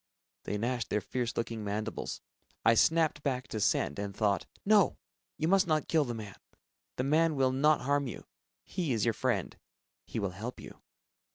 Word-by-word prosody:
They 105 Hz, -, -2 dB
gnashed 120 Hz, +1 st, -1 dB
their 105 Hz, -, +1 dB
fierce 120 Hz, +2 st, -3 dB
looking 115 Hz, -1 st, -2 dB
mandibles. 105 Hz, +1 st, -3 dB, 0.4 s
I 115 Hz, -, +7 dB
snapped 160 Hz, +4 st, +3 dB
back 130 Hz, -2 st, -2 dB
to 110 Hz, -, -3 dB
"send" 100 Hz, 0 st, +1 dB
and 100 Hz, -1 st, -4 dB
thought. 105 Hz, -3 st, +1 dB, 0.2 s
"No... 205 Hz, -2 st, +4 dB, 0.4 s
you 155 Hz, -, 0 dB
must 195 Hz, +1 st, +4 dB
not 155 Hz, -2 st, +1 dB
kill 160 Hz, -3 st, +3 dB
the 120 Hz, -2 st, -4 dB
man. 105 Hz, -3 st, -8 dB, 0.6 s
The -, -, -1 dB
man 155 Hz, +3 st, +3 dB
will 135 Hz, -1 st, +3 dB
not 150 Hz, +3 st, +3 dB
harm 140 Hz, +1 st, +1 dB
you... 120 Hz, -, -7 dB, 0.4 s
he 165 Hz, -, -2 dB
is 110 Hz, -4 st, +1 dB
your 115 Hz, -, +2 dB
friend. -, -, -1 dB, 0.5 s
He -, -, -5 dB
will 100 Hz, -4 st, -1 dB
help 110 Hz, +7 st, -6 dB
you." -, -, -11 dB
125 Hz, 180 wpm, -31 LUFS, 110-155 Hz, 0.6 s, I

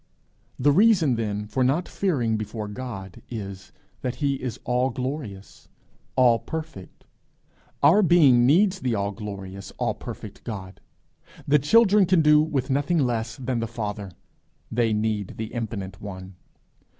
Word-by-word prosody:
The 145 Hz, +3 st, +3 dB
reason 180 Hz, -, +4 dB
then 105 Hz, -2 st, -2 dB
for 130 Hz, +5 st, -1 dB
not 145 Hz, +8 st, +1 dB
fearing 130 Hz, -, 0 dB
before 110 Hz, 0 st, -4 dB
God 105 Hz, -5 st, -7 dB
is, 100 Hz, -4 st, -7 dB, 0.3 s
that 125 Hz, -1 st, -3 dB
he 140 Hz, -2 st, -1 dB
is 125 Hz, -3 st, -4 dB
all 125 Hz, +2 st, +1 dB
glorious, 125 Hz, -8 st, -6 dB, 0.5 s
all 120 Hz, -3 st, +5 dB
perfect. 155 Hz, -, -8 dB, 0.8 s
Our 165 Hz, +9 st, +6 dB
being 145 Hz, -10 st, +5 dB
needs 190 Hz, +6 st, +4 dB
the 125 Hz, -7 st, -1 dB
all 100 Hz, 0 st, -1 dB
glorious, 100 Hz, -2 st, -7 dB
all -, -, 0 dB
perfect -, -, -9 dB
God. 95 Hz, -4 st, -7 dB, 0.7 s
The 150 Hz, +1 st, +5 dB
children 205 Hz, -, +5 dB
can 180 Hz, -3 st, +4 dB
do 150 Hz, 0 st, +6 dB
with 140 Hz, -4 st, -1 dB
nothing 145 Hz, +6 st, +1 dB
less 115 Hz, -5 st, 0 dB
than 125 Hz, -2 st, -2 dB
the 115 Hz, -, -2 dB
Father; 105 Hz, -3 st, -5 dB, 0.6 s
they 115 Hz, -1 st, +1 dB
need 105 Hz, -2 st, -1 dB
the 110 Hz, 0 st, -5 dB
infinite 100 Hz, -5 st, -5 dB
one. 95 Hz, -2 st, -8 dB
120 Hz, 140 wpm, -25 LUFS, 105-145 Hz, 0.8 s, Our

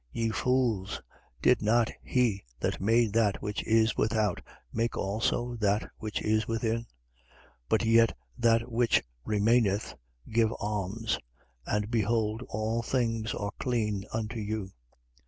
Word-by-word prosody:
11:40. -, -, -2 dB
Ye 115 Hz, -, +2 dB
fools, 120 Hz, -6 st, 0 dB, 0.4 s
did 125 Hz, -, +5 dB
not 115 Hz, +2 st, +3 dB
he 120 Hz, -6 st, +1 dB, 0.2 s
that -, -, -1 dB
made 115 Hz, +1 st, +3 dB
that 110 Hz, -3 st, +2 dB
which 105 Hz, 0 st, -3 dB
is 110 Hz, -1 st, +3 dB
without 110 Hz, -3 st, +1 dB, 0.3 s
make 115 Hz, +1 st, -1 dB
also 115 Hz, +4 st, -1 dB
that 105 Hz, -1 st, +1 dB
which 105 Hz, -1 st, -3 dB
is 110 Hz, 0 st, +1 dB
within? 115 Hz, 0 st, 0 dB
11:41. 115 Hz, -, -7 dB, 0.8 s
But 110 Hz, -, +2 dB
yet 115 Hz, 0 st, +4 dB, 0.2 s
that 115 Hz, 0 st, +2 dB
which 115 Hz, 0 st, +3 dB, 0.2 s
remaineth, 105 Hz, -1 st, +2 dB, 0.4 s
give 110 Hz, 0 st, +3 dB
alms: 105 Hz, +2 st, -2 dB, 0.5 s
and 105 Hz, +1 st, -1 dB
behold, 110 Hz, 0 st, +1 dB
all 110 Hz, +2 st, -1 dB
things 115 Hz, -3 st, -1 dB
are 100 Hz, 0 st, -3 dB
clean 105 Hz, -5 st, 0 dB
unto 110 Hz, +1 st, -3 dB
you. 105 Hz, -2 st, -3 dB
110 Hz, 135 wpm, -29 LUFS, 105-115 Hz, 0.8 s, did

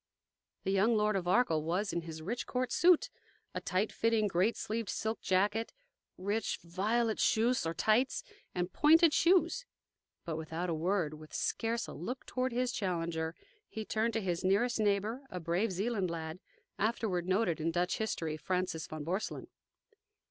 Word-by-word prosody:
The 190 Hz, -, 0 dB
young 210 Hz, +4 st, +3 dB
Lord 210 Hz, 0 st, +2 dB
of 180 Hz, -2 st, -1 dB
Arkell 180 Hz, -6 st, +3 dB
was 185 Hz, +6 st, -1 dB
in 170 Hz, -, 0 dB
his 160 Hz, -1 st, -8 dB
rich 235 Hz, +8 st, -3 dB
court 255 Hz, 0 st, -1 dB
suit 360 Hz, +8 st, +4 dB, 0.4 s
a -, -, -3 dB
tight 195 Hz, +4 st, 0 dB
fitting, 225 Hz, -1 st, +2 dB
great 190 Hz, +4 st, +1 dB
sleeved 220 Hz, -2 st, -3 dB
silk 220 Hz, +1 st, -2 dB
jacket, 205 Hz, +4 st, +1 dB, 0.4 s
rich, 205 Hz, +4 st, -1 dB
violet 215 Hz, +6 st, 0 dB
chausses, 230 Hz, -4 st, +2 dB
or 165 Hz, -, -2 dB
tights, 230 Hz, +5 st, +2 dB, 0.3 s
and 180 Hz, 0 st, -2 dB
pointed 320 Hz, +1 st, +6 dB
shoes. 370 Hz, +9 st, +3 dB, 0.6 s
But 165 Hz, -3 st, -3 dB
without 160 Hz, +2 st, -3 dB
a -, -, +1 dB
word, 165 Hz, -1 st, 0 dB
with 155 Hz, 0 st, -10 dB
scarce 230 Hz, +1 st, -1 dB
a -, -, -8 dB
look 245 Hz, -, -5 dB
toward 255 Hz, 0 st, -1 dB
his 245 Hz, +1 st, 0 dB
challenger, 165 Hz, -5 st, -2 dB, 0.3 s
he 220 Hz, -1 st, -5 dB
turned 225 Hz, +2 st, 0 dB
to 225 Hz, -, 0 dB
his 180 Hz, -2 st, -2 dB
nearest 220 Hz, +6 st, +2 dB
neighbor, 210 Hz, +4 st, +1 dB
a 180 Hz, -, -5 dB
brave 175 Hz, +6 st, 0 dB
Zealand 195 Hz, 0 st, -1 dB
lad, 160 Hz, 0 st, -5 dB, 0.4 s
afterward 205 Hz, -5 st, 0 dB
noted 185 Hz, -4 st, +1 dB
in 165 Hz, -, +1 dB
Dutch 175 Hz, +2 st, 0 dB
history 165 Hz, -8 st, -2 dB
Francis 180 Hz, -1 st, -2 dB
von 155 Hz, -1 st, -6 dB
Borselen. 185 Hz, +7 st, -3 dB
195 Hz, 165 wpm, -33 LUFS, 170-230 Hz, 0.6 s, pointed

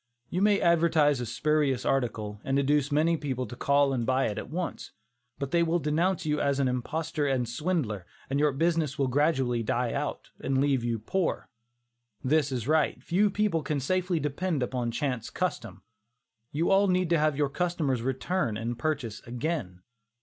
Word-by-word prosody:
You 180 Hz, -, 0 dB
may 205 Hz, 0 st, +4 dB
advertise 160 Hz, -5 st, +3 dB
a 120 Hz, -, -3 dB
spurious 150 Hz, -2 st, +1 dB
article, 110 Hz, -6 st, -1 dB
and 135 Hz, +1 st, 0 dB
induce 145 Hz, +1 st, +2 dB
many 160 Hz, +3 st, +3 dB
people 130 Hz, -4 st, -3 dB
to 120 Hz, -, -8 dB
call 140 Hz, +2 st, +2 dB
and 120 Hz, -3 st, 0 dB
buy 130 Hz, +2 st, +2 dB
it 105 Hz, -, -5 dB
once, 170 Hz, +1 st, -4 dB, 0.4 s
but 140 Hz, -1 st, -4 dB
they 170 Hz, -, +3 dB
will 170 Hz, +1 st, +2 dB
denounce 170 Hz, +4 st, 0 dB
you 150 Hz, -1 st, 0 dB
as 140 Hz, -1 st, +1 dB
an 135 Hz, -, +2 dB
imposter 145 Hz, +4 st, -2 dB
and 130 Hz, -3 st, 0 dB
swindler, 120 Hz, -, -2 dB, 0.2 s
and 140 Hz, +1 st, -1 dB
your 150 Hz, 0 st, +3 dB
business 160 Hz, 0 st, 0 dB
will 140 Hz, -, +2 dB
gradually 130 Hz, -3 st, +1 dB
die 120 Hz, +1 st, -1 dB
out, -, -, -4 dB
and 135 Hz, 0 st, -1 dB
leave 135 Hz, -3 st, +2 dB
you 120 Hz, -1 st, 0 dB
poor. 170 Hz, -, -2 dB, 0.7 s
This 145 Hz, +1 st, +2 dB
is 125 Hz, -2 st, -3 dB
right. 155 Hz, -5 st, +1 dB
Few 195 Hz, +7 st, +2 dB
people 205 Hz, -5 st, +1 dB
can 150 Hz, -1 st, -2 dB
safely 180 Hz, +4 st, 0 dB
depend 150 Hz, 0 st, -1 dB
upon 125 Hz, -1 st, -2 dB
chance 125 Hz, -2 st, -2 dB
custom. 115 Hz, -, -3 dB, 0.7 s
You 165 Hz, +6 st, 0 dB
all 195 Hz, +1 st, +5 dB
need 180 Hz, -2 st, +1 dB
to 170 Hz, -, +4 dB
have 155 Hz, -2 st, +2 dB
your 145 Hz, -2 st, +1 dB
customers 155 Hz, -6 st, -1 dB
return 130 Hz, -, -1 dB
and 115 Hz, +2 st, -4 dB
purchase 125 Hz, -7 st, -2 dB
again. 120 Hz, -, -3 dB
145 Hz, 175 wpm, -28 LUFS, 125-165 Hz, 0.7 s, all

